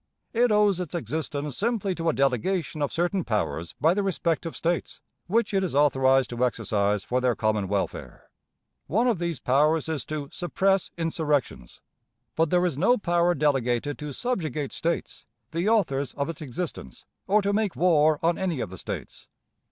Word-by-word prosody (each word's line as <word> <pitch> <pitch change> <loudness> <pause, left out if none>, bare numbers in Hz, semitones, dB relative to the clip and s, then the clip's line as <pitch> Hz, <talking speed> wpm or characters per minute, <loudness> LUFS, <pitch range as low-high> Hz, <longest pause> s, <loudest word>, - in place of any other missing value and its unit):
It 240 0 +3
owes 210 -3 +3
its 180 -2 -4
existence 145 0 -3
simply 210 -3 0
to 165 -1 -1
a - - +1
delegation 145 - 0
of 145 - 0
certain 175 +2 0
powers 85 - -2
by 160 +2 +4
the 205 - 0
respective 170 -3 -1
States, 170 0 -2 0.3
which 225 +4 +1
it 195 -1 +2
is 175 -7 -2
authorized 135 -3 +3
to 120 +1 -1
exercise 105 -4 0
for 125 +1 -1
their 125 -2 +2
common 110 -3 0
welfare. 100 0 -4 0.6
One 230 +8 +2
of 225 -8 +1
these 170 -4 -2
powers 150 +4 +2
is 155 -6 -2
to 150 -2 -5
"suppress 190 +2 0
insurrections"; 150 - -2 0.5
but 165 0 +2
there 180 +1 +3
is 155 -6 -1
no 245 +9 +4
power 175 -2 +2
delegated 135 -2 0
to 150 -1 -5
subjugate 155 - -2
States, 170 0 -3 0.2
the 170 +5 0
authors 140 - +1
of 140 +2 -2
its 165 - -6
existence, 155 +4 -6 0.2
or 205 +2 +3
to 200 +1 +1
make 210 -2 0
war 155 -3 +4
on 170 +1 +2
any 180 -7 -1
of 100 - -4
the 95 - -9
States. - - -7
160 Hz, 170 wpm, -26 LUFS, 135-180 Hz, 0.6 s, by